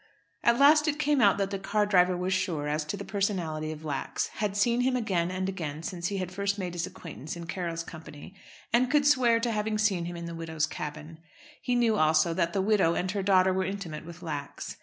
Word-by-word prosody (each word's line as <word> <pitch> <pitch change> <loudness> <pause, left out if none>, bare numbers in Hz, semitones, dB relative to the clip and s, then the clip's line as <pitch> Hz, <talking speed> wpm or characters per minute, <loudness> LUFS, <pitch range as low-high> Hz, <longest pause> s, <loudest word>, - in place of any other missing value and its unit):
At 235 0 +4
last 300 +3 +6
it 295 -1 +1
came 295 -2 +2
out 200 -3 +5
that 195 -1 -1
the 195 - -3
car 210 +2 +1
driver 180 -3 +3
was 180 +1 -1
sure 170 -6 -1
as 150 +1 -1
to 155 - -4
the - - -7
personality 175 -6 -2
of 155 0 -8
Lax, 140 -3 -2
had 205 -2 -1
seen 235 +4 +2
him 255 +1 +2
again 190 -8 0
and 185 +1 -2
again 160 -5 -4
since 175 -1 -3
he 200 - -3
had 185 -1 -3
first 200 +1 -1
made 180 -3 -4
his 170 -1 -2
acquaintance 155 -2 -8
in 170 -1 -7
Carroll's 170 -1 -3
company, 160 0 -11 0.4
and 245 +1 +4
could 290 0 +3
swear 250 -5 +4
to 235 0 -1
having 215 0 -1
seen 200 -5 +1
him 175 0 -5
in 170 - -6
the 170 - -6
widow's 160 -2 -2
cabin. 155 +1 -7 0.4
He 245 - 0
knew 230 -3 +3
also 155 +1 +3
that 170 0 0
the 190 +2 0
widow 195 -5 +3
and 185 +1 -1
her 200 0 -2
daughter 190 -1 +4
were 190 0 0
intimate 180 -5 -5
with 170 +2 -11
Lax. 145 -4 -6
185 Hz, 230 wpm, -28 LUFS, 165-210 Hz, 0.4 s, last